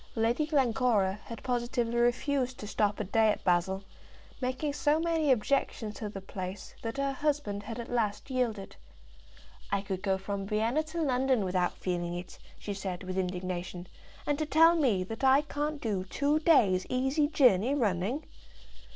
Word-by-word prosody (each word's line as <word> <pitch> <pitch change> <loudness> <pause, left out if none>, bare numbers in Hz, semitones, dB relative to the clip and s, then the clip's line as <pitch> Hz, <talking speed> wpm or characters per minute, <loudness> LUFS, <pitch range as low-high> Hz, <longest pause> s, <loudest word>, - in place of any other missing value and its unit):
Lady 235 +6 +1
Glencora 235 - +2
had 230 - -8
positively 240 -1 -1
refused 255 +1 +1
to - - -7
stop 210 0 0
a - - 0
day 220 +3 +3
at 210 - -1
Basle, 190 +2 +1 0.6
making 260 +3 -1
so 295 +2 +2
many 325 -3 +1
objections 245 -3 0
to 215 0 -5
the 195 -1 -7
place 185 0 -7
that 225 +3 -4
her 275 0 0
husband 280 -7 -1
had 225 +3 -7
at 235 - -5
last 220 0 -1
yielded. 230 -6 -2 1.0
"I 200 -1 +1
could 190 -2 -4
go 190 -1 +1
from 195 0 -4
Vienna 225 +7 +1
to 325 +1 -3
London 260 -5 +2
without 180 -1 0
feeling 175 -1 -2
it," 180 +1 -8 0.2
she 205 - -5
said, 190 -2 -5
with 185 0 -5
indignation; 180 -1 -3 0.4
"and 290 0 0
to 310 - 0
tell 325 +3 +6
me 240 - +2
that 225 +7 -7
I 265 +2 +6
can't 295 0 -3
do 205 -7 -1
two 290 +9 +1 0.5
easy 265 +4 +1
days' - - -15
journey 250 -2 +4
running!" 220 - 0
230 Hz, 165 wpm, -30 LUFS, 195-275 Hz, 1.0 s, tell